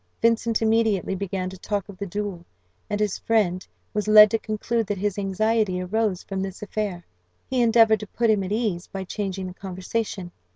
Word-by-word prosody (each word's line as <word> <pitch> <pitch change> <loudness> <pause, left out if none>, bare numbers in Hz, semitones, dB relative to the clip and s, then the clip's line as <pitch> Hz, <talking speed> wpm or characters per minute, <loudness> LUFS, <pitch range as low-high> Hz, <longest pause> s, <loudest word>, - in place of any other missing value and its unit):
Vincent 230 0 +2
immediately 220 -4 +2
began 190 -1 -3
to 185 0 -8
talk 205 -1 -2
of 200 - -10
the 200 - -3
duel, 200 -2 -4 0.5
and 205 - -1
his 210 -2 0
friend 185 -5 +1 0.3
was 210 0 -1
led 215 -1 +9
to 225 - +1
conclude 220 +1 -2
that 205 - -2
his 205 +1 -1
anxiety 205 0 +1
arose 195 0 -1
from 195 -1 -4
this 195 +1 -5
affair. 200 -4 -3 0.4
He 255 -1 0
endeavoured 225 -2 +5
to 210 - -7
put 230 +2 +1
him 205 -2 +2
at 185 - -5
ease 210 -6 -1
by 195 -1 -5
changing 190 0 -4
the 180 - -6
conversation. 190 0 -4
205 Hz, 190 wpm, -24 LUFS, 190-220 Hz, 0.5 s, led